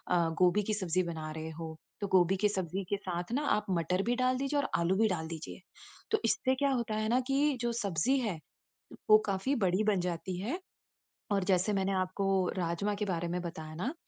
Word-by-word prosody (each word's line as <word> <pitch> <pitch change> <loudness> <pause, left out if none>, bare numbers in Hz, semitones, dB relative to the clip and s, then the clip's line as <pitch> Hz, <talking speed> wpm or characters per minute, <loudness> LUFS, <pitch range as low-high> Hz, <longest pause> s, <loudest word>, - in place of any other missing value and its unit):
अ, 170 -1 +3
गोभी 185 +3 +4
की 215 - -1
सब्ज़ी 185 -2 0
बना 160 -2 -5
रहे 160 +1 -5
हो, 160 0 -7 0.2
तो 200 - -1
गोभी 185 0 +4
की 210 +1 +2
सब्ज़ी 190 -1 -2
के 200 - +1
साथ 180 0 -4
ना 290 +3 0
आप 210 - -3
मटर 180 +2 +1
भी 240 +1 +1
डाल 255 0 +2
दीजिए 275 +2 0
और - - -1
आलू 175 +3 +2
भी 220 +1 +4
डाल 160 -3 -2
दीजिए। 160 +2 -7 0.5
तो 435 - +3
इससे 260 0 +2
क्या 280 +1 +1
होता 235 -4 -1
है 215 0 0
ना, 250 +2 +4
कि 275 +1 +1
जो 240 -1 0
सब्ज़ी 200 - +1
है 210 -9 -2 0.7
वो 215 - +10
काफ़ी 200 +8 0
बड़ी 190 0 +2
बन 205 -3 +3
जाती 180 +1 -3
है। 265 - -3 0.7
और 195 -2 +2
जैसे 190 +2 +2
मैंने 195 0 +1
आपको 185 +1 -1 0.3
राजमा 180 +4 -1
के 210 +1 -2
बारे 175 -2 -1
में 180 +1 -2
बताया 160 -2 -6
ना, 250 - -2
195 Hz, 215 wpm, -31 LUFS, 175-225 Hz, 0.7 s, वो